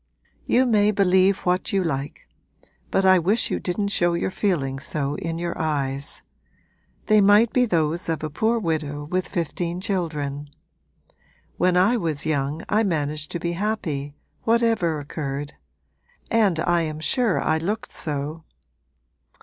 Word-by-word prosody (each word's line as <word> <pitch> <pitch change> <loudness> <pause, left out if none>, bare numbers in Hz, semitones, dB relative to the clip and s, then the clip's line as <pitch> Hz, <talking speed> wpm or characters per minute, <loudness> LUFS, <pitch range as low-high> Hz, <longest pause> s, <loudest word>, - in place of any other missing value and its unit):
'You 255 +2 +4
may 210 -4 +3
believe 190 -1 +3
what 180 +1 +1
you 195 -1 +1
like; 140 -4 -4 0.6
but 195 - +1
I 185 -1 +6
wish 200 +7 +1
you - - 0
didn't 200 +3 -2
show 175 -3 +2
your 170 - -1
feelings 135 -10 -1
so 145 -2 -2
in 165 -1 -4
your 170 0 -3
eyes. 140 -3 -2 0.8
They 215 -1 +5
might 205 +3 +5
be 250 -1 +4
those 165 -2 0
of 160 -1 -2
a 155 - -2
poor 220 +9 +1
widow 155 -7 -2
with 180 +5 -2
fifteen 170 +1 -3
children. 150 -7 -3 1.1
When 180 +1 +2
I 205 +7 +4
was 160 -8 0
young 145 +1 -1
I 215 - +2
managed 155 -6 -1
to 170 - -2
be 170 +1 -2
happy, 170 -8 -3 0.3
whatever 225 -8 +2
occurred; 145 0 -5 0.8
and 205 -8 +3
I 175 0 +2
am 155 -1 -3
sure 230 - +1
I 160 0 +1
looked 205 +7 -3
so.' 150 +1 -4
170 Hz, 145 wpm, -23 LUFS, 150-200 Hz, 1.1 s, I